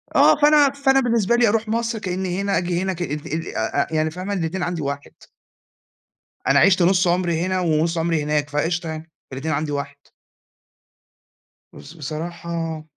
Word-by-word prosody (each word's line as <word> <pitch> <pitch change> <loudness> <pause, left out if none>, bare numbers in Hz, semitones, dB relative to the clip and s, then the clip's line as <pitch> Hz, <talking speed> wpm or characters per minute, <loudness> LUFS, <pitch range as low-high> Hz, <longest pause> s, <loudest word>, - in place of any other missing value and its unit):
آه، - - +6
فأنا 295 -1 +6
فأنا 270 -1 +2
بالنسبة 235 -3 +2
لي، 240 -1 +4
أروح 220 +1 +1
مصر، 230 0 -1
كأنّي 185 -1 -3
هنا، 200 0 0
آجي 175 0 -1
هنا، 190 0 -1
كأنّي 170 -4 -4 0.4
أ - - -3
أ 110 +6 0
أ - - -10
يعني 155 0 +1
فاهمة 185 +4 -5
الإتنين 175 0 -2
عندي 175 -2 -2
واحد. 140 0 -5 1.4
أنا - - +5
عِشت 185 0 +5
نُص 185 +1 +3
عمري 175 -2 +1
هنا، 185 +1 0
ونُص 165 0 +1
عمري 165 -2 0
هناك، 150 -1 -1
فقشطة 165 +3 -1
يعني 160 +1 -7 0.2
الإتنين 145 +4 -2
عندي 150 0 -2
واحد. 140 0 -4 1.8
بس 150 - -12
بصراحة 165 +1 -5
175 Hz, 160 wpm, -22 LUFS, 155-195 Hz, 1.8 s, آه